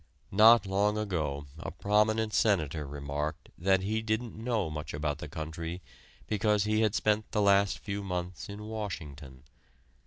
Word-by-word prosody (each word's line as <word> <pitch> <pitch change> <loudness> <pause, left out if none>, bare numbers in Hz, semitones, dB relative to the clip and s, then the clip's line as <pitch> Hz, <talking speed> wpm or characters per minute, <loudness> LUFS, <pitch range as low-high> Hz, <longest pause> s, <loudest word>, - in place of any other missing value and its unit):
Not 110 +2 +7
long 100 +2 +1
ago 80 -9 -2
a - - -5
prominent 105 +1 +1
senator 80 - +1
remarked 75 +2 -4
that 95 +2 +2
he 110 +3 0
didn't 110 +1 -2
know 110 -4 -1
much 75 -1 -5
about 75 -1 -2
the - - -6
country, 80 +2 -5 0.5
because 105 -1 +2
he 110 +1 +1
had 110 -2 +2
spent 105 0 +1
the - - +1
last 100 -1 +4
few 100 0 -4
months 90 -2 -4
in 100 +1 -7
Washington. 80 -12 -6
100 Hz, 150 wpm, -30 LUFS, 80-105 Hz, 0.5 s, Not